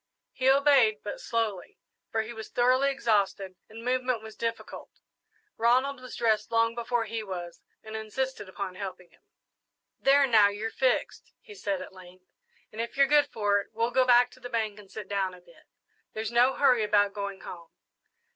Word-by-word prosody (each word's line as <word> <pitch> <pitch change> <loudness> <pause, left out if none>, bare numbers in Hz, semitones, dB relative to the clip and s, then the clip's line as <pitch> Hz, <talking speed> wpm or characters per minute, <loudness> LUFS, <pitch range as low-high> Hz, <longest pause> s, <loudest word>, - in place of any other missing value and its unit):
He 260 +1 +1
obeyed, 270 -6 +4
but 205 - -6
slowly, 220 -5 -3 0.3
for 220 0 -1
he 230 +2 -8
was 220 -1 -8
thoroughly 255 +3 +3
exhausted 205 -7 0 0.2
and 225 +2 -10
movement 255 -2 0
was 220 0 -10
difficult. 230 0 -5 0.7
Ronald 255 +4 +2
was 255 - -9
dressed 220 -3 +1
long 230 0 +2
before 235 0 -1
he 225 +1 -4
was, 175 -4 -7 0.2
and 220 0 -8
insisted 220 0 -4
upon 190 0 -5
helping 185 -2 -8
him. - - -26 0.8
"There, 280 +1 +5
now 220 -5 +6
you're 210 +2 -4
fixed," 255 -1 -1
he 430 - -14
said, 200 - -3
at - - -12
length; 185 0 -15 0.5
"and 220 - -4
if 235 +3 -6
you're 275 - +6
good 290 +1 +4
for 205 -2 +1
it, 200 - -7
we'll 230 +2 0
go 260 +1 +4
back 245 0 +5
to - - -17
the 245 0 -8
bank 220 -3 -2
and 200 -2 -15
sit 210 -1 -8
down 195 -2 -1
a - - -15
bit. 215 +9 -22 0.5
There's 220 0 -4
no 245 +3 +4
hurry 255 -5 +4
about 205 -1 +2
going 200 -1 -5
home." 170 -2 -10
225 Hz, 185 wpm, -28 LUFS, 200-250 Hz, 0.8 s, now